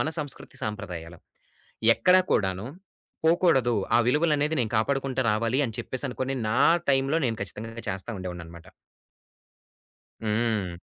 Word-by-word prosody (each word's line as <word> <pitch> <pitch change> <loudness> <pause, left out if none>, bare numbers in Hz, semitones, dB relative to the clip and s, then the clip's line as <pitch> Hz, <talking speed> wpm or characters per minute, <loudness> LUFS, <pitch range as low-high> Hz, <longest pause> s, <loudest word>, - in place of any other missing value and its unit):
మన 155 - 0
సంస్కృతి 145 -3 -6
సంప్రదాయాలు 85 -5 -6 0.8
ఎక్కడ 180 0 +5
కూడాను 95 +1 0 0.6
పోకూడదు 160 -8 +3 0.2
ఆ - - +5
విలువలనేది 150 +2 +2
నేను 110 - -1
కాపాడుకుంటూ 135 +3 0
రావాలి 115 +5 +1
అని 110 -2 -6
చెప్పేసనుకోని 130 0 -3
నా 115 - +1 0.3
టైమ్‌లో 135 +3 +2
నేను 115 -2 -2
ఖచ్చితంగా 115 +4 -7
చేస్తా 95 +3 -4
ఉండేవాడిననమాట. 85 -2 -8 1.6
హ్మ్. 105 -5 0
115 Hz, 110 wpm, -26 LUFS, 100-135 Hz, 1.6 s, ఎక్కడ